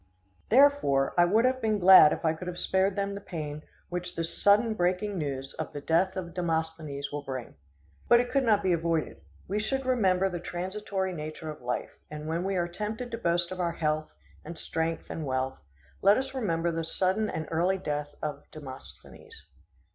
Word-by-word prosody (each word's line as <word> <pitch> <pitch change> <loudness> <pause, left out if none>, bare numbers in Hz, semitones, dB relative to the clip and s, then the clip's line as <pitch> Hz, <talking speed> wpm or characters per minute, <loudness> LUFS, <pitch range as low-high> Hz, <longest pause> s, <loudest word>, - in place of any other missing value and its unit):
Therefore, 250 - +4
I 175 - +6
would 215 +7 +3
have 260 0 +1
been 215 -1 +1
glad 185 -5 +9
if - - -3
I 160 - +3
could 180 +3 -8
have 180 -1 -5
spared 190 +1 +1
them 200 0 -1
the 200 - -6
pain 150 -5 -6 0.3
which 180 0 -4
this 165 0 -1
sudden 215 +3 +4
breaking 180 +1 0
of 195 - -4
the 150 - -1
news 135 -1 -4
of - - -4
the 145 - -4
death 170 +6 +1
of 175 -2 -5
Demosthenes 160 -4 -2
will 145 0 -3
bring. 130 -3 -6 0.5
But 240 - +7
it 245 0 -1
could 275 -1 +2
not 215 -4 +3
be 185 -2 +3
avoided. 165 -1 -1 0.3
We 205 +3 -1
should 265 +5 -2
remember 195 -7 +2
the 175 -2 -4
transitory 190 +2 -3
nature 155 -1 -6
of 150 - -11
life, 125 0 -3 0.2
and 150 0 -7
when 165 +2 -1
we 195 0 -1
are 175 -1 0
tempted 215 +7 -5
to 230 - -3
boast 170 -3 +1
of 185 - -6
our 170 -1 0
health, 155 -1 -1 0.3
and 165 +1 -8
strength, 165 0 -2
and 160 - -4
wealth, 130 -1 -2 0.4
let 200 +2 +6
us 265 +1 -3
remember 170 -9 0
the 165 0 -2
sudden 190 +6 0
and 160 - -4
early 175 +4 +2
death 150 -5 -4
of 150 -1 -5
Demosthenes. 135 -4 -12
175 Hz, 200 wpm, -28 LUFS, 155-200 Hz, 0.5 s, glad